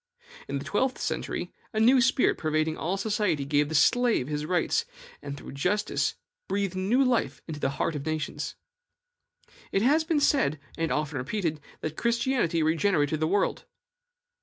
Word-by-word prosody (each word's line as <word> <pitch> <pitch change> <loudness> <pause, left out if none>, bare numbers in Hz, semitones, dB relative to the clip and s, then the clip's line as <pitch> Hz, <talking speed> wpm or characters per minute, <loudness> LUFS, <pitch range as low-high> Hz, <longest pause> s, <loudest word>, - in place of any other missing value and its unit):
In - - -2
the - - -6
twelfth 260 -1 0
century, - - -3 0.2
a 215 - 0
new 250 +4 +6
spirit 260 +1 +3
pervading 155 0 0
all 180 +5 -2
society 195 -8 0
gave 145 +1 +2
the 160 - -3
slave 235 - +3
his 150 0 -3
rights, 175 -1 +1 0.4
and 140 0 -6
through - - -9
justice 180 +10 0 0.3
breathed 200 -2 -1
new 205 +9 +2
life 250 -2 +1
into 155 -3 -5
the 135 - 0
heart 165 - 0
of 145 - -4
nations. 155 0 -3 1.2
It 195 - +1
has 300 +6 +4
been 315 -1 +1
said, 265 - +2 0.2
and 165 -1 -1
often 150 -2 -1
repeated, 155 +2 -2 0.2
that 155 0 -4
Christianity 235 -8 +1
regenerated 155 -2 +2
the 155 - +1
world. 200 +4 0
170 Hz, 160 wpm, -27 LUFS, 155-230 Hz, 1.2 s, new